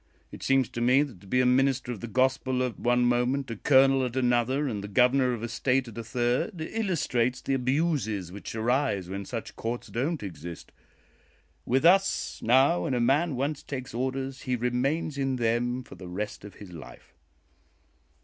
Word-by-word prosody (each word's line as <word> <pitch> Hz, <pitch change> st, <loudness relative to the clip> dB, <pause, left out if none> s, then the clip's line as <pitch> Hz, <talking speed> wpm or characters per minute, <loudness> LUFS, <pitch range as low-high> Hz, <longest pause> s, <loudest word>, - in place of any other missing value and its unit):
"It -, -, -10 dB
seems 135 Hz, -2 st, +2 dB
to 120 Hz, -, -5 dB
me 130 Hz, +4 st, +4 dB
that 120 Hz, -12 st, -9 dB
to 100 Hz, -, -16 dB
be 125 Hz, +6 st, +2 dB
a -, -, +2 dB
minister 130 Hz, 0 st, +2 dB
of 115 Hz, -, -6 dB
the 120 Hz, -, -6 dB
Gospel 130 Hz, +2 st, +1 dB
at 125 Hz, -3 st, -3 dB
one 120 Hz, 0 st, +2 dB
moment, 125 Hz, +2 st, +1 dB
a -, -, -3 dB
colonel 135 Hz, +3 st, +4 dB
at 125 Hz, -1 st, -3 dB
another, 130 Hz, +3 st, +1 dB
and 105 Hz, -6 st, -3 dB
the -, -, -5 dB
Governor 125 Hz, +4 st, +3 dB
of 115 Hz, -2 st, -5 dB
a -, -, -1 dB
State 125 Hz, +2 st, 0 dB
at 115 Hz, -, -10 dB
a 115 Hz, -, -5 dB
third, 125 Hz, -, -1 dB
illustrates 155 Hz, -, -1 dB
the 135 Hz, -, -2 dB
abuses 130 Hz, -, 0 dB
which 100 Hz, +3 st, -8 dB
arise 110 Hz, -5 st, 0 dB
when 100 Hz, +1 st, -5 dB
such 115 Hz, +1 st, -6 dB
courts 120 Hz, +2 st, -4 dB
don't 140 Hz, +3 st, -2 dB
exist. 85 Hz, -2 st, -8 dB, 1.0 s
With 130 Hz, +5 st, +2 dB
us, 195 Hz, +3 st, +3 dB
now, 135 Hz, +9 st, +4 dB
when 135 Hz, -6 st, 0 dB
a -, -, +1 dB
man 140 Hz, +6 st, +2 dB
once 140 Hz, +3 st, -2 dB
takes 130 Hz, -4 st, -6 dB
orders, 130 Hz, +2 st, -3 dB
he 130 Hz, -1 st, -1 dB
remains 135 Hz, +5 st, -1 dB
in 135 Hz, -1 st, 0 dB
them 120 Hz, +1 st, 0 dB
for -, -, -13 dB
the 90 Hz, -, -10 dB
rest 105 Hz, +4 st, -5 dB
of 100 Hz, -2 st, -11 dB
his 100 Hz, -3 st, -11 dB
life." 85 Hz, -3 st, -12 dB
125 Hz, 190 wpm, -27 LUFS, 115-135 Hz, 1.0 s, me